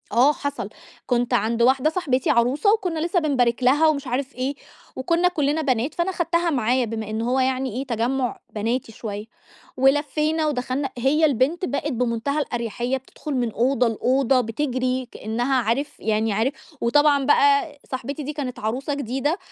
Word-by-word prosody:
آه 265 +5 +5
حصل، 285 0 -4 0.4
كُنت 245 0 0
عند 235 0 +1
واحدة 260 +4 +4
صاحبتي 295 -7 0
عروسة، 265 - +3
وكُنّا 360 -7 -1
لسّه 345 +3 +1
بنبارك 255 -6 +1
لها 290 +6 +5
ومش 285 -3 0
عارف 260 +3 -3
إيه، 260 +3 -2 0.4
وكُنّا 335 +7 +2
كُلِّنا 300 -3 0
بنات 260 -1 0
فأنا 350 +2 -1
خدتها 340 -1 0
معايا 250 -3 +1
بما 220 -1 -5
إن 220 +1 -2
هو 250 +3 +1
يعني 260 -2 0
إيه، 265 +2 -3
تجمُّع 245 +2 -1 0.2
بناتي 230 +3 -2
شوية، 210 -1 -6 0.5
ولفّينا 300 +4 +2
ودخلنا، 265 0 -2
هي 280 +6 +3
البنت 290 +6 +1
بقِت 295 -1 -2
بمنتهى 245 +4 -1
الأريحية 240 0 -2
بتدخل 265 +3 -9
من 240 -3 0
أوضة 250 +3 +2
لأوضة 255 +3 +2
بتجري 255 +1 -2
كأنّها 240 +5 -1
عارف 275 +7 -1
يعني 220 0 0
عارف 225 +7 +1 0.3
وطبعًا 285 +3 +3
بقى 375 -1 +3
صاحبتي 270 +3 -4
دي 295 +2 -4
كانت 270 -4 -5
عروسة 255 +7 -2
جديدة، 280 +4 -1
265 Hz, 155 wpm, -23 LUFS, 240-295 Hz, 0.5 s, آه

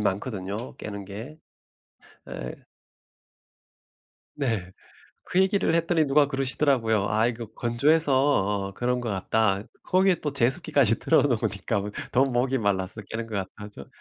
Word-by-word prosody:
많거든요 105 +2 -3
깨는 100 -1 -7
게. 110 +10 -8 0.9
예 60 +1 -6 1.8
네. 110 -10 -2 0.5
그 185 - +2
얘기를 190 -3 +2
했더니 165 -2 +2
누가 145 +1 +4
그러시더라고요. 130 -6 +1
"아 110 +1 +2
이거 120 -1 -3
건조해서 140 +6 +2
어 105 -8 +1
그런 125 0 -1
것 120 - -4
같다." 100 0 +1 0.2
거기에 185 -1 +3
또 150 -2 -2
제습기까지 120 -2 +2
틀어 160 - +3
놓으니까 110 -5 0 0.3
더 130 +2 +4
목이 130 +1 0
말라서 100 -1 -1
깨는 115 +1 -4
것 110 -2 -5 0.2
같다죠. 105 -9 -10
120 Hz, 280 characters per minute, -26 LUFS, 105-140 Hz, 1.8 s, 누가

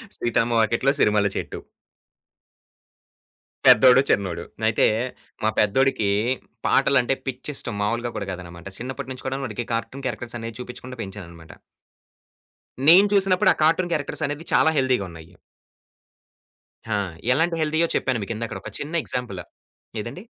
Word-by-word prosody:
'సీతమ్మ 120 0 0
వాకిట్లో 115 +5 +2
సిరిమల్లే 105 -1 +3
చెట్టు.' - - -5 2.1
పెద్దోడు, 125 +1 +8
చిన్నోడు. 90 -4 0 0.3
అయితే, 115 - +3 0.6
మా 110 - +3
పెద్దోడికి 110 0 +2 0.6
పాటలంటే 135 -1 +3
పిచ్చిష్టం 130 -2 -4
మాములుగా 115 +3 -1
కూడా 100 - -4
కాదనమాట. 85 -1 -9
చిన్నప్పటి 130 +2 -6
నుంచి 130 - -11
కూడా 135 +1 -2
వాడికి 120 -1 -4
కార్టూన్ 130 +4 -4
క్యారెక్టర్సనే 120 -2 -5
చూపించకుండా 125 0 -8
పెంచాననమాట. 85 -5 -10 1.3
నేను 185 +5 +9
చూసినప్పుడు, 190 0 +4
ఆ - - -20
కార్టూన్ 170 +3 +2
క్యారెక్టర్సనేది 145 0 -2
చాలా 160 - +5
హెల్తీగా 130 -6 +2
ఉన్నాయి. 80 +1 -13 1.6
ఆ! - - +2 0.4
ఎలాంటి 165 +5 +1
హెల్తీయో 155 +2 +2
చెప్పాను 125 -4 0
మీకు 110 +3 -4
ఇందాకడ 110 -3 -4
ఒక - - -7
చిన్న 150 +3 -5
ఎగ్జాంపులు. 100 -8 -4 0.6
ఏదండి? 120 - -7
120 Hz, 120 wpm, -23 LUFS, 105-140 Hz, 2.1 s, నేను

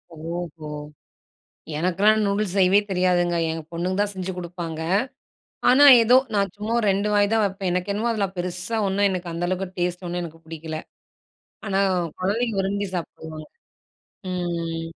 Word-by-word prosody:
ஓஹோ! 165 -1 -6 1.1
எனக்கெல்லாம் 200 +6 +3
நூடுல்ஸ் 200 -1 0
செய்யவே 190 +1 +5
தெரியாதுங்க. 180 -2 +2 0.2
எங்க 160 0 -4
பொண்ணுங்க 180 +3 -2
தான் 205 0 0
செஞ்சு 190 0 -4
குடுப்பாங்க. 170 -2 -5 0.9
ஆனா, 275 +3 +7 0.2
ஏதோ 250 +3 +6 0.2
நான் 200 -2 +1
சும்மா 215 +3 -2
2 200 +2 +1
வாய் 205 +1 +3
தான் 220 -1 +3
வெப்பேன். 195 -2 -2
எனக்கு 180 +3 -1
என்னமோ 220 +4 0
அதில 200 -3 0
பெருசா 180 +5 -3
ஒண்ணும், 200 +1 +2
எனக்கு 180 -2 -3
அந்த 170 +1 -2
அளவுக்கு 185 0 -3
டேஸ்ட் 180 +1 -2
ஒண்ணும் 175 +1 -3
எனக்கு 165 -1 -10
புடிக்கல. 160 -1 -6 0.9
ஆனா, 195 -1 +1 0.4
குழந்தைங்க 215 +3 0
விரும்பி 200 +1 -1
சாப்பிடுவாங்க. 160 -2 -6 0.8
ம் 170 -2 -3
185 Hz, 140 wpm, -24 LUFS, 170-200 Hz, 1.1 s, ஆனா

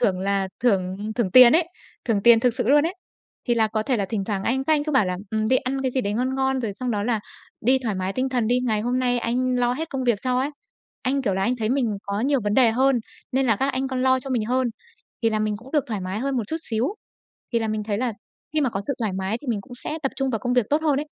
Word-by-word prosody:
thưởng 190 -6 +1
là 195 0 0
thưởng 190 -6 +1 0.2
thưởng 230 -6 0
tiền 250 +3 +9
ấy, 335 +1 +3 0.4
thưởng 215 -4 0
tiền 235 0 +7
thực 245 -1 +2
sự 245 -2 -2
luôn 295 +2 +5
ấy. 350 - -4 0.5
Thì 240 - +4
là 225 -1 +3
có 215 0 -2
thể 250 +2 0
là 200 - 0
thỉnh 205 -4 -1
thoảng 195 -2 -2
anh 265 +3 0
các 315 - +2
anh 295 -1 0
cứ 305 - -2
bảo 260 -7 +4
là 180 0 -2
"Ừm, 220 0 0
đi 260 - +4
ăn 270 +1 -2
cái 260 - 0
gì 260 - 0
đấy 205 -4 -2
ngon 255 +4 -1
ngon 265 -1 0
rồi 225 -4 -2
xong 250 +4 -4
đó 205 -2 -1
là 225 -1 0 0.4
đi 260 +3 +3
thoải 220 -4 -1
mái 185 +1 -2
tinh 260 +3 -1
thần 245 -4 0
đi. 245 +2 +2
Ngày 215 -3 +1
hôm 245 +3 0
nay 245 -1 +1
anh 250 +2 0
lo 245 0 +2
hết 320 +6 -4
công 265 -2 -3
việc 235 -5 +2
cho" 250 0 +1
ấy. 275 +3 0 0.5
Anh, 275 +2 0
kiểu 200 -7 0
là, 190 - -1
anh 245 +4 +1
thấy 220 -2 -1
mình 240 -5 0
có 200 +1 -3
nhiều 275 +1 +2
vấn 205 0 +1
đề 245 -4 +5
hơn, 260 +2 +3 0.3
nên 265 0 +2
là 225 -3 +3
các 270 +4 0
anh 265 +1 -1
còn 255 -1 -2
lo 260 0 +3
cho 270 - -8
mình 240 -4 0
hơn, 255 +2 +1 0.5
thì 225 - +3
là 215 - 0
mình 215 -1 -1
cũng 250 +5 -14
được 295 -4 +2
thoải 215 -4 -3
mái 185 +3 -3
hơn 270 +2 -1
một 240 - +1
chút 320 - -2
xíu. 225 +2 +1 0.7
Thì 235 - +3
là 225 -1 -2
mình 215 0 -2
thấy 205 -1 -2
là 245 -2 -1 0.4
khi 305 - +2
mà 260 -4 +1
có 195 - -3
sự - - 0
thoải 215 -5 -1
mái 190 +3 -2
thì 290 - -12
mình 220 -4 -1
cũng 245 - -15
sẽ 315 - -3
tập 270 - -1
trung 270 0 0
vào 225 - -1
công 245 +4 -2
việc 245 -4 +3
tốt 305 +2 +2
hơn 295 -3 +2
ấy. 300 - -5
245 Hz, 305 wpm, -23 LUFS, 215-260 Hz, 0.7 s, tiền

